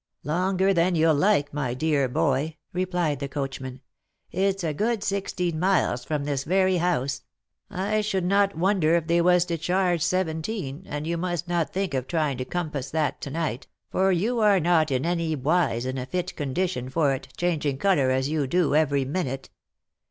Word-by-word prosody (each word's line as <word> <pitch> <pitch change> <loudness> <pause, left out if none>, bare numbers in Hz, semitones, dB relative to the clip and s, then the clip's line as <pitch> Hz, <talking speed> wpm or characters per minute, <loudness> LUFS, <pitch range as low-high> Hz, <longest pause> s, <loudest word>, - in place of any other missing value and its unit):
" - - -54
Longer 185 +5 +1
than 175 0 +2
you'll 160 0 +4
like, 145 -2 +2
my 130 -4 -2
dear 145 -2 +1
boy," 150 +2 0 0.2
replied 175 -5 -1
the 140 - -3
coachman. 135 -2 -5 0.2
" - - -46
It's 195 +1 0
a 160 -2 -1
good 220 +6 -1
sixteen 180 -5 -2
miles 180 -9 +1
from 150 -2 -2
this 140 -2 -2
very 185 +2 +2
house; 165 -6 0 0.5
I 205 +2 0
should 195 -4 -1
not 200 0 +2
wonder 175 -2 +3
if 170 -2 +1
they 170 +1 +2
was 180 0 +4
to 170 -2 -3
charge 180 0 +1
seventeen, 170 -2 -2
and 150 +1 -4
you 170 +1 -1
must 175 0 -2
not 175 -2 0
think 190 -4 -2
of 130 -1 -2
trying 150 -6 -1
to 130 - -2
compass 150 -5 -3
that 155 0 -1
to - - -5
night, 150 -4 -3 0.2
for 190 +1 +2
you 220 +7 +1
are 205 -3 +5
not 165 -2 +3
in 130 +1 0
any 170 -2 0
wise 140 -4 +1
in 130 +1 -3
a 125 - -5
fit 180 +3 -3
condition 145 -2 -2
for 145 -1 +2
it, 135 - -6
changing 155 -6 0
colour, 145 -6 +2
as 130 +1 +1
you 150 -2 -1
do, 170 0 +1
every 145 -3 +2
minute. 135 -3 -3
165 Hz, 190 wpm, -25 LUFS, 140-185 Hz, 0.5 s, are